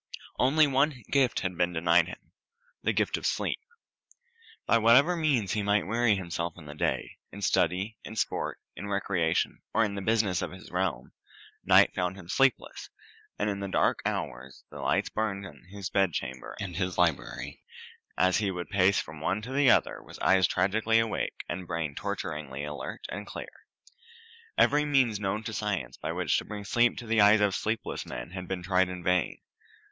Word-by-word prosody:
Only 150 Hz, +5 st, +5 dB
one 135 Hz, -2 st, +1 dB
gift 130 Hz, -5 st, +2 dB
had 90 Hz, -2 st, -2 dB
been 90 Hz, +1 st, +1 dB
denied 85 Hz, 0 st, +3 dB
him 90 Hz, -, -11 dB, 0.5 s
the -, -, +1 dB
gift -, -, 0 dB
of -, -, -7 dB
sleep. -, -, -1 dB, 1.1 s
By 115 Hz, -, +4 dB
whatever 125 Hz, +10 st, +5 dB
means 140 Hz, -, +1 dB
he 105 Hz, -, 0 dB
might 105 Hz, +1 st, +2 dB
weary 115 Hz, +1 st, +2 dB
himself 85 Hz, -2 st, -3 dB
in 80 Hz, -, -12 dB
the 75 Hz, -, -8 dB
day 75 Hz, -, -2 dB
in 100 Hz, +1 st, -8 dB
study, 95 Hz, +6 st, +1 dB
in 110 Hz, -, -8 dB
sport, -, -, -2 dB, 0.2 s
in 100 Hz, -, -6 dB
recreation, 95 Hz, -5 st, 0 dB
or 115 Hz, -, +4 dB
in 100 Hz, -, -3 dB
the 100 Hz, -, -4 dB
business 105 Hz, -3 st, +1 dB
of -, -, -2 dB
the 95 Hz, 0 st, -12 dB
realm 90 Hz, -9 st, -2 dB, 0.5 s
night -, -, +6 dB
found 90 Hz, +1 st, -1 dB
him 90 Hz, -3 st, -12 dB
sleepless, 135 Hz, +3 st, +1 dB, 0.5 s
and 105 Hz, -, 0 dB
all 100 Hz, -, -1 dB
the 100 Hz, -, -3 dB
dark -, -, +2 dB
hours 65 Hz, +2 st, -4 dB
the -, -, -9 dB
lights -, -, +1 dB
burned 100 Hz, -2 st, -2 dB
in 95 Hz, -, -13 dB
his 95 Hz, 0 st, -7 dB
bedchamber 70 Hz, -9 st, -1 dB
and 100 Hz, -, -3 dB
in 85 Hz, -, -3 dB
his 90 Hz, -1 st, -2 dB
library, 85 Hz, -5 st, -1 dB, 0.6 s
as 95 Hz, 0 st, +3 dB
he 105 Hz, -2 st, 0 dB
would 90 Hz, -2 st, -5 dB
pace 95 Hz, 0 st, +4 dB
from 80 Hz, -1 st, -7 dB
one 95 Hz, -, 0 dB
to 125 Hz, +4 st, -6 dB
the 140 Hz, -1 st, +4 dB
other, -, -, +3 dB
with -, -, -12 dB
eyes 95 Hz, -1 st, +5 dB
tragically 110 Hz, +4 st, +2 dB
awake 115 Hz, -1 st, -1 dB
and 90 Hz, 0 st, -5 dB
brain 80 Hz, -3 st, -2 dB
torturingly 75 Hz, -8 st, -4 dB
alert 75 Hz, 0 st, -6 dB
and 105 Hz, 0 st, -6 dB
clear. -, -, -9 dB, 0.9 s
Every 150 Hz, +1 st, +4 dB
means 130 Hz, -8 st, +2 dB
known 105 Hz, +2 st, -2 dB
to 110 Hz, 0 st, -5 dB
science 100 Hz, -, -2 dB
by -, -, -4 dB
which -, -, +1 dB
to -, -, -8 dB
bring 105 Hz, 0 st, -6 dB
sleep 120 Hz, +4 st, +2 dB
to 120 Hz, -, -6 dB
the 115 Hz, -1 st, +3 dB
eyes 105 Hz, +1 st, +7 dB
of 100 Hz, -2 st, +3 dB
sleepless 110 Hz, +4 st, -2 dB
men -, -, -7 dB
had 90 Hz, -1 st, -6 dB
been 95 Hz, -1 st, -4 dB
tried 95 Hz, 0 st, +2 dB
in 90 Hz, -1 st, -6 dB
vain. 90 Hz, -2 st, +1 dB
100 Hz, 185 wpm, -28 LUFS, 90-110 Hz, 1.1 s, eyes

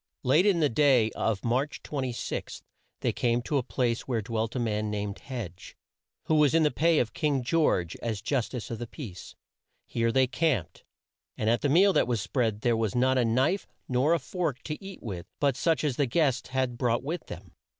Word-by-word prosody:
Late 155 Hz, +9 st, +4 dB
in 180 Hz, -5 st, +3 dB
the 150 Hz, -, +5 dB
day 125 Hz, -4 st, +3 dB
of 110 Hz, -1 st, -2 dB
March 130 Hz, +5 st, -1 dB
26, 130 Hz, -5 st, -4 dB, 0.4 s
they -, -, +1 dB
came 120 Hz, 0 st, +1 dB
to 145 Hz, +3 st, 0 dB
a -, -, 0 dB
place 120 Hz, -1 st, -1 dB
where 115 Hz, -4 st, -1 dB
dwelt 115 Hz, 0 st, -2 dB
a -, -, 0 dB
man 105 Hz, -2 st, -1 dB
named 105 Hz, -1 st, -3 dB
Hedge, 110 Hz, -, -8 dB, 0.5 s
who -, -, 0 dB
was 150 Hz, -1 st, +4 dB
in 165 Hz, -, +5 dB
the 150 Hz, -, +3 dB
pay 165 Hz, +1 st, +3 dB
of 115 Hz, -7 st, 0 dB
King 145 Hz, -4 st, 0 dB
George 120 Hz, -, +1 dB
as 110 Hz, -3 st, -3 dB
justice 125 Hz, 0 st, -2 dB
of 115 Hz, -, -4 dB
the 120 Hz, -, -5 dB
peace. 110 Hz, -, -9 dB, 0.5 s
Here 115 Hz, 0 st, 0 dB
they 130 Hz, +2 st, +4 dB
camped, 120 Hz, -, -1 dB, 0.5 s
and 110 Hz, +1 st, +1 dB
at 120 Hz, -, +1 dB
the 145 Hz, -, +1 dB
meal 190 Hz, +7 st, +5 dB
that -, -, +3 dB
was 120 Hz, -3 st, 0 dB
spread 110 Hz, 0 st, -1 dB
there 120 Hz, 0 st, +2 dB
was 110 Hz, 0 st, -1 dB
not 130 Hz, +1 st, +3 dB
a -, -, +3 dB
knife 130 Hz, -, +1 dB, 0.2 s
nor 130 Hz, +6 st, +2 dB
a -, -, -1 dB
fork 150 Hz, -1 st, -3 dB
to 150 Hz, +5 st, -6 dB
eat 195 Hz, -1 st, -9 dB
with 90 Hz, -6 st, -6 dB
but 140 Hz, -3 st, +2 dB
such 165 Hz, +3 st, +1 dB
as 145 Hz, -5 st, 0 dB
the 145 Hz, -, +2 dB
guests 135 Hz, -2 st, +1 dB
had 130 Hz, -2 st, -1 dB
brought 120 Hz, 0 st, +1 dB
with 160 Hz, +4 st, -4 dB
them. -, -, -9 dB
125 Hz, 205 wpm, -28 LUFS, 115-150 Hz, 0.5 s, the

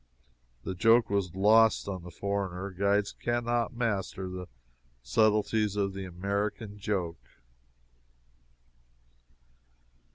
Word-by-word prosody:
That 95 Hz, -2 st, -5 dB
joke 115 Hz, +1 st, +5 dB
was 95 Hz, -3 st, 0 dB
lost 110 Hz, +3 st, +5 dB
on 95 Hz, -2 st, -4 dB
the 90 Hz, -, -10 dB
foreigner 100 Hz, +1 st, -3 dB
guides 100 Hz, +2 st, +1 dB
can 120 Hz, 0 st, -2 dB
not 120 Hz, +1 st, 0 dB
master 100 Hz, -5 st, -2 dB
the 90 Hz, -1 st, -6 dB, 0.6 s
subtleties 105 Hz, -, +2 dB
of 100 Hz, -1 st, 0 dB
the 95 Hz, 0 st, -5 dB
American 100 Hz, +3 st, -3 dB
joke. 90 Hz, -, -2 dB
100 Hz, 100 wpm, -29 LUFS, 95-110 Hz, 0.6 s, joke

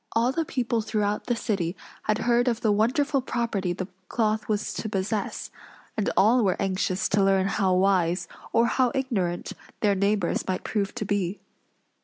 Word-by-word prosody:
All 235 Hz, +2 st, +3 dB
the 325 Hz, +4 st, -1 dB
people 240 Hz, -4 st, -1 dB
throughout 210 Hz, -1 st, -1 dB
the 240 Hz, -, 0 dB
city 195 Hz, -6 st, -2 dB, 0.3 s
had 215 Hz, -, +2 dB
heard 240 Hz, +1 st, +3 dB
of 235 Hz, -2 st, +1 dB
the 215 Hz, -, +3 dB
wonderful 265 Hz, +7 st, +2 dB
property 230 Hz, -7 st, -1 dB
the 185 Hz, +1 st, -4 dB, 0.2 s
cloth 215 Hz, -1 st, 0 dB
was 210 Hz, -1 st, -1 dB
to 220 Hz, -, -4 dB
possess; 205 Hz, +1 st, -2 dB, 0.4 s
and 210 Hz, -, 0 dB
all 230 Hz, +4 st, +5 dB
were 190 Hz, -3 st, +1 dB
anxious 190 Hz, -1 st, 0 dB
to 200 Hz, 0 st, +3 dB
learn 195 Hz, -1 st, +3 dB
how 195 Hz, -2 st, +1 dB
wise, 185 Hz, -2 st, +2 dB, 0.2 s
or 230 Hz, -, +4 dB
how 250 Hz, +1 st, +2 dB
ignorant, 200 Hz, -10 st, -1 dB, 0.3 s
their 205 Hz, -2 st, +4 dB
neighbors 200 Hz, -2 st, 0 dB
might 185 Hz, -1 st, -2 dB
prove 200 Hz, -3 st, -2 dB
to 210 Hz, -, -3 dB
be. 200 Hz, -1 st, -1 dB
210 Hz, 170 wpm, -26 LUFS, 190-235 Hz, 0.4 s, all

